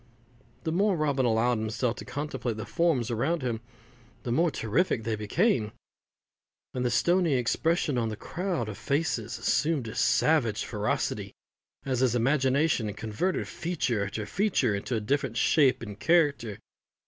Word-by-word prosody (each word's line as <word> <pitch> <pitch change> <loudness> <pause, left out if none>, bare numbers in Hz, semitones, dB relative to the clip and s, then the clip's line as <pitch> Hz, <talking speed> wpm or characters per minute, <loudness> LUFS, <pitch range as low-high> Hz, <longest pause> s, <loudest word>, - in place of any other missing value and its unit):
The 160 - -1
more 195 +2 +2
Robin 140 -4 +1
allowed 115 +1 +2
himself 110 +2 -1
to - - -8
contemplate 135 -5 -4
the 110 - -5
forms 145 -9 +1
around 135 +7 0
him, 115 -3 -2 0.6
the 120 - -3
more 165 +7 +3
terrific 125 - 0
they 110 0 -1
became; 110 - +1 1.0
and 125 - -2
the 125 - +1
stoney 170 +6 +2
expression 145 +3 +1
of 115 -1 0
this 110 - -5
crowd 175 - -3
of 105 - -7
faces 130 -7 -1
assumed 145 +2 +1
a 110 - -6
savage 125 -10 +2
ferocity 105 -1 -2 0.5
as 130 -3 0
his 125 -2 +2
imagination 135 -1 +2
converted 110 - -2
feature 135 - -1
after 105 +2 -4
feature 175 - +1
into 100 +5 -2
a - - +1
different 130 +1 -1
shape 135 -4 +3
and 105 -2 -8
character. 145 - +2
125 Hz, 150 wpm, -28 LUFS, 110-160 Hz, 1.0 s, more